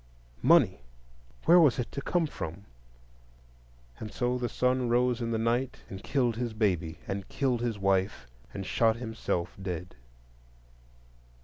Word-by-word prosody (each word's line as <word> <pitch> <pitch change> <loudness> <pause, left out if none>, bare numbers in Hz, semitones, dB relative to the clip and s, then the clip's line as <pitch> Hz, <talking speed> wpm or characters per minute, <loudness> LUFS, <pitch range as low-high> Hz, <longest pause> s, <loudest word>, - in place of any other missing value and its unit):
Money! - - +5 0.6
Where 175 +2 +8
was 150 -7 +5
it 125 - -3
to 140 - -4
come 175 +3 +1
from? 100 - -6 1.3
And 110 - -6
so 125 0 -1
the 120 -1 -1
son 125 +1 +1
rose 125 0 +2
in 115 - -1
the 115 - 0
night 120 +3 -1
and 95 0 -7
killed 125 -5 +1
his 120 -2 -2
baby, 90 -7 0
and 100 0 -4
killed 125 -4 0
his 120 -3 -1
wife, 95 - 0 0.3
and 95 - -6
shot 115 +2 +2
himself 110 -7 -3
dead. 90 -1 -5
115 Hz, 140 wpm, -29 LUFS, 95-125 Hz, 1.3 s, Where